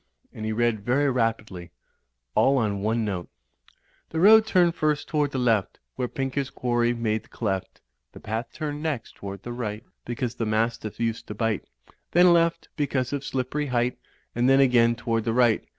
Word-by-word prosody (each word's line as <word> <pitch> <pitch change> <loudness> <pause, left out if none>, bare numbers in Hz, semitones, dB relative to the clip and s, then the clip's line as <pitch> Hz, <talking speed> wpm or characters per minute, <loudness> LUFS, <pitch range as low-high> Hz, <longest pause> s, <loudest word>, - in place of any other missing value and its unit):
And 110 0 -5
he - - -1
read 110 -2 0
very 135 +5 +2
rapidly, 110 -7 -2 0.6
all 135 +1 +4
on 105 -5 0
one 110 +2 0
note: 95 -4 -4 0.8
"The 160 - -3
road 220 +4 +7
turned 175 -4 +4
first 155 -3 0
toward 150 -2 +1
the 135 - -4
left 115 -6 +1 0.2
Where 125 -1 -2
Pinker's 135 +1 -3
quarry 120 -1 0
made 110 -2 -1
the - - -23
cleft; 95 -5 -3 0.3
The - - -11
path 110 +3 -4
turned 150 -2 -5
next 150 -8 -3
toward 100 -1 -7
the 120 - -5
right 110 -2 -4 0.2
Because 120 0 -3
the 115 -2 -3
mastiff 110 0 -1
used 115 -1 -2
to 105 - -6
bite; 110 -2 -1 0.5
Then, 175 0 +6
left, 170 0 +2
because 140 -3 -1
of 140 -1 -2
Slippery 135 +3 -2
Height, 125 -1 0 0.3
And 120 +2 +2
then 135 0 +5
again 120 -3 +4
toward 115 -1 -1
the 115 - -1
right. 120 -2 +3
120 Hz, 180 wpm, -25 LUFS, 110-140 Hz, 0.8 s, road